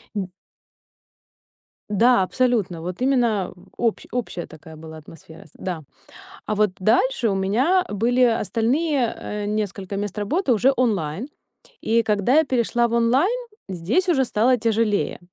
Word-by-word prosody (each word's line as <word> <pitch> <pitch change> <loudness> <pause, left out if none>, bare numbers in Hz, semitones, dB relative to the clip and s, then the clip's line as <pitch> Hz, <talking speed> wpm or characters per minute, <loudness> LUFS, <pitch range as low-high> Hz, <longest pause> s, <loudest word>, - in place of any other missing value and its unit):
Н 190 -3 -2 1.6
Да, 225 0 +4
абсолютно. 215 -7 0
Вот 180 +5 -6
именно 235 -9 +1 0.2
общ 230 -2 -1
общая 230 -8 -4
такая 160 0 -13
была 160 0 -10
атмосфера, 160 +1 -14
да. 175 -5 -5 0.6
А 215 - -2
вот 210 -2 +2
дальше 235 +4 +2
у 195 - 0
меня 255 - +2
были 240 +5 +1
остальные, 245 +5 +1
а, 210 0 -5
несколько 205 -2 -3
мест 205 0 -4
работы 270 - 0
уже 255 +5 +3
онлайн. 205 - -1 0.5
И 230 +1 +2
когда 210 +4 +1
я 320 - +6
перешла 240 -3 +1
в 235 - -5
онлайн, 260 - +2 0.3
здесь 195 - 0
уже 270 -6 +3
стало 240 +3 +2
тяжелее. 220 -2 0
220 Hz, 135 wpm, -22 LUFS, 195-250 Hz, 1.6 s, я